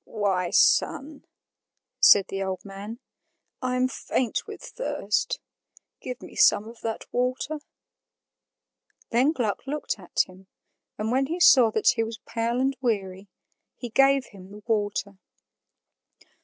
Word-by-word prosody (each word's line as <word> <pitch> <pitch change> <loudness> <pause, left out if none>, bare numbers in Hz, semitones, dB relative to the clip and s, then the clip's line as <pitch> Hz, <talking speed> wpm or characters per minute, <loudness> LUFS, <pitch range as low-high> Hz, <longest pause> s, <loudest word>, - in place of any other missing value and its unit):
"Why 195 -5 -1
son," 285 - +2 0.7
said 200 -2 +6
the 195 - -4
old 190 0 -4
man, 200 +3 -8 0.6
"I 255 -1 -1
am 255 0 +2
faint 255 -2 -2
with - - -9
thirst; 215 - -2 0.6
give 250 -1 -7
me - - -11
some 210 - +4
of 230 +1 -12
that 225 -1 -4
water." 255 +5 -1 1.5
Then 255 +6 +3
Gluck 245 -4 -3
looked 290 -6 -3
at 180 - 0
him, 185 +1 -17 0.5
and 215 +2 -2
when 265 +2 +1
he 335 +4 -3
saw 255 -9 +7
that 220 - +3
he 225 - +2
was 225 0 -6
pale 235 +1 -1
and 270 +1 +1
weary, 200 -5 -2 0.5
he 245 - -7
gave 270 +2 +4
him 190 -2 -13
the 205 +1 -12
water. 205 -3 -2
230 Hz, 135 wpm, -26 LUFS, 200-255 Hz, 1.5 s, saw